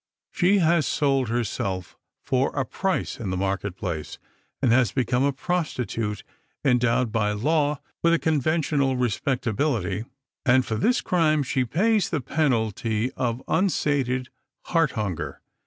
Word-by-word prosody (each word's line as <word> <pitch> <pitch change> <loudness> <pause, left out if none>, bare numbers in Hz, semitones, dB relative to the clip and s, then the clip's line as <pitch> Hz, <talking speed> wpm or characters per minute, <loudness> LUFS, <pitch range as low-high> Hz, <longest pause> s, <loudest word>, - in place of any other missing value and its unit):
She 195 +3 +3
has 170 -3 +3
sold 135 -5 +1
herself 100 -6 -2 0.3
for 130 +1 +1
a 135 -2 0
price 190 +5 -2
in 110 -5 -3
the 95 - -2
market 95 0 -2
place, 85 -5 -5 0.4
and 130 -4 +2
has 120 -1 +4
become 125 -1 0
a 140 - +3
prostitute 130 - -2 0.4
endowed 125 -2 +2
by 105 -2 +1
law 145 +6 +1 0.2
with 170 - +4
a 170 - +4
conventional 150 -3 +1
respectability, 120 -4 -1 0.4
and 130 0 +4
for - - -3
this 245 - +2
crime 155 -4 +2
she 130 -1 0
pays 200 - +2
the 160 - -1
penalty 115 -5 0
of 120 -1 -2
unsated 140 -8 +1 0.3
heart 165 -3 +1
hunger. 100 - -3
130 Hz, 135 wpm, -25 LUFS, 115-155 Hz, 0.4 s, has